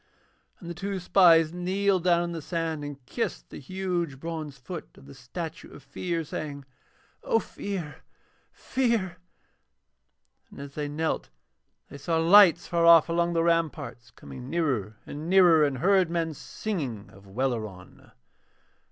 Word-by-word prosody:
And 170 - -11
the 170 - -4
two 195 +3 -4
spies 170 -3 +5
kneeled 185 +1 0
down 175 -1 +4
in 170 - -4
the 165 -1 -5
sand 165 -2 -3
and 140 -3 -8
kissed - - -4
the - - -8
huge 175 -3 -3
bronze 155 -3 -6
foot 155 +7 -8
of - - -16
the 140 - -12
statue 155 +6 -7
of - - -13
Fear, 170 -2 -3
saying: 145 -2 -6 0.6
'O - - +2
Fear, 190 -8 -5 0.5
Fear.' 230 -9 -1 1.3
And - - -13
as 140 0 -8
they 150 -1 -3
knelt 155 +2 -2 0.6
they 140 - -9
saw 165 +3 -1
lights 175 +1 +6
far 170 -1 +1
off 170 -1 +7
along 170 +1 +1
the 165 -1 +1
ramparts 150 -8 -1
coming 125 +1 -11
nearer 130 - -1
and 155 +3 -7
nearer, 180 -4 +6
and 140 -3 0
heard 185 +2 +3
men 165 -2 -1
singing 140 - -5
of 100 +1 -17
Welleran. 110 -4 -4
165 Hz, 145 wpm, -27 LUFS, 140-175 Hz, 1.3 s, off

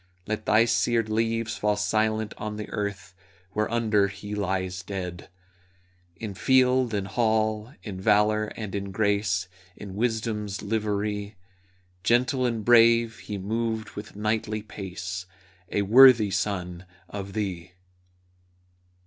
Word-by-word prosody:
Let 110 0 -4
thy 110 +1 +5
seared 115 -1 +1
leaves 115 0 0
fall 105 0 +1
silent 110 +1 0
on 105 0 -4
the 105 0 -6
earth 100 -3 -4 0.4
Whereunder 110 -2 +2
he 100 +1 -8
lies 95 -2 -2
dead! 90 -2 -6 0.9
In 110 -3 -6
field 130 +2 +3
and 100 -1 -1
hall, 110 +2 0
in 95 -4 -6
valor 105 +1 +3
and 105 -3 -5
in 100 -1 -3
grace, 100 -1 +1 0.3
In 100 -2 -8
wisdom's 105 -2 -2
livery, 105 -1 -2 0.7
Gentle 125 +5 +2
and 115 -3 -3
brave, 115 -1 +5
he 105 - -6
moved 110 +2 -2
with 105 0 -9
knightly 105 0 -1
pace, 95 -3 -6 0.4
A 100 - 0
worthy 115 -1 +7
son 90 -3 -3 0.2
of 100 0 -7
thee! 90 -5 -4
105 Hz, 120 wpm, -26 LUFS, 100-110 Hz, 0.9 s, worthy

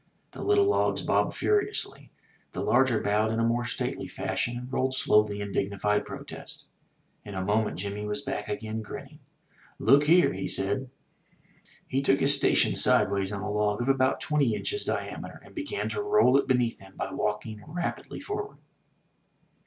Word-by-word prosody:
The - - -9
little 405 0 +4
logs 405 - +1
bobbed - - +1
furiously; 420 0 -1 0.4
the - - -3
larger 130 -4 +3
bowed 105 +2 +1
in 110 - -1
more 120 +1 +1
stately - - -3
fashion 120 0 -2
and 125 +2 -8
rolled 130 0 0
slowly 105 -4 +2
in 100 0 -4
dignified 100 +1 0
protest. - - -9 0.6
In 100 - -8
a 95 0 -2
moment 105 +2 +1
Jimmy 100 +2 -4
was 105 +6 -2
back 135 -7 -4
again, 110 +1 -3
grinning. 105 - -9 0.6
''Look 140 +5 +5
here," 175 - +5
said 130 +7 0 1.0
he. 130 - -2
He - - +3
took 140 0 +3
his 140 +1 +3
station 140 - +3
sideways 100 -1 +3
on 100 -1 -4
a 105 - -3
log 105 0 +1
of 120 +2 -1
about 130 -1 +2
twenty 140 -7 +1
inches 415 - -3
diameter, - - -4
and - - -16
began 310 +6 -3
to 425 - -2
roll 415 - +4
it 140 - +3
beneath 125 -3 +1
him 95 0 -15
by - - -3
walking 105 0 -3
rapidly 175 +3 -4
forward. 415 +1 -5
120 Hz, 165 wpm, -28 LUFS, 105-140 Hz, 1.0 s, Look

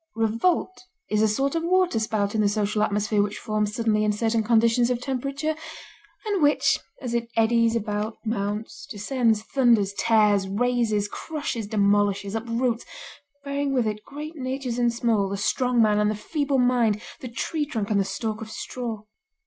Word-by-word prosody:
Revolt 230 +12 0 0.3
is 210 0 +2
a 220 - +4
sort 270 +6 0
of 330 - 0
waterspout 225 - +1
in 220 - +1
the 205 - +3
social 210 0 0
atmosphere 210 0 +1
which 205 0 -2
forms 215 -2 -2
suddenly 220 -3 +1
in 210 - +2
certain 225 +2 +1
conditions 230 +2 +3
of 250 -1 0
temperature, 275 +4 -2 0.7
and 410 -4 0
which, 290 0 +3 0.2
as 245 -3 -4
it 235 -1 -1
eddies 230 0 +3
about, 215 0 -2
mounts, 210 0 -3
descends, 220 0 0
thunders, 230 -6 +2
tears, 210 -4 +3
razes, 220 -1 +1
crushes, 275 -4 -4
demolishes, 205 -1 +1
uproots, 230 +1 -1 0.6
bearing 280 0 -1
with 245 -3 +2
it 210 -1 -3
great 300 +3 -8
natures 255 -3 -3
and 240 -1 +3
small, 230 -4 +1
the 200 - -3
strong 250 +4 +1
man 210 -1 +3
and 210 0 +2
the 215 - -1
feeble 280 +5 -1
mind, 245 -4 +2 0.2
the 255 - -6
tree 295 +6 -2
trunk 220 -7 -3
and 205 - +3
the - - +3
stalk 215 +3 -4
of 220 - -7
straw. 225 -2 -5
225 Hz, 165 wpm, -25 LUFS, 210-250 Hz, 0.7 s, a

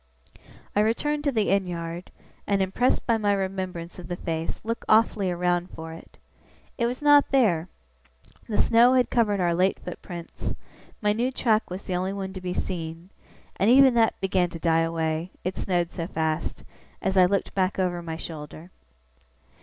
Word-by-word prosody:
I - - +3
returned 290 +8 +1
to 285 - +3
the 220 -5 +1
inn 195 -1 +2
yard, 170 0 -5 0.4
and, 200 -1 +2
impressed 190 +7 +1
by 230 -2 +2
my 205 -1 +2
remembrance 185 -3 -4
of 175 - -8
the 175 - -3
face, 165 -2 -3
looked 230 +1 -3
awfully 215 -3 +4
around 175 0 0
for 160 0 -8
it. 165 - -14 0.6
It 235 - +2
was 250 +4 -4
not 290 -1 +6
there. 195 -12 +2 0.8
The 210 - -1
snow 240 +2 +5
had 250 -1 +2
covered 210 -4 +2
our 175 -2 +2
late 185 +3 +2
footprints; 175 -1 -7 0.5
my 210 0 +3
new 240 +4 0
track 225 -4 +1
was 185 +2 -6
the 185 - -3
only 185 +2 -1
one 190 -1 -5
to 190 - -7
be 180 0 -3
seen; 165 0 -4 0.5
and 200 - +3
even 265 +1 +7
that 230 -1 +2
began 185 -2 +1
to 165 - -7
die 165 0 +2
away 165 0 -1
(it 185 +1 -2
snowed 175 -2 -1
so 165 -1 -4
fast) 160 -2 -2 0.4
as 190 0 -1
I 185 -1 +6
looked 200 +1 -1
back 185 -1 0
over 180 -2 0
my 165 -1 -5
shoulder. 160 +1 -9
185 Hz, 175 wpm, -26 LUFS, 170-215 Hz, 0.8 s, even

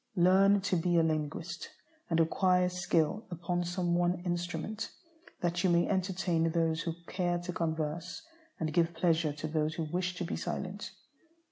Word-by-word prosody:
Learn 190 +2 +5
to 190 -1 0
be 175 0 +2
a 165 - +5
linguist, 160 +2 -2 0.4
and 165 -1 +2
acquire 180 +2 +3
skill 180 +3 0
upon 175 0 -2
some 175 0 -1
one 175 +1 +2
instrument, 175 +4 -3 0.5
that 175 0 0
you 185 - +4
may 170 0 +3
entertain 180 -3 +1
those 165 -1 +1
who 165 -1 -3
care 175 -1 0
to 175 +1 -5
converse, 160 - -2 0.4
and 155 -1 -1
give 170 -1 +2
pleasure 160 -2 +2
to 150 +2 -5
those 155 0 0
who 165 - -2
wish 180 +3 -2
to 180 - -3
be - - -3
silent. 195 +2 -4
175 Hz, 160 wpm, -31 LUFS, 165-180 Hz, 0.5 s, Learn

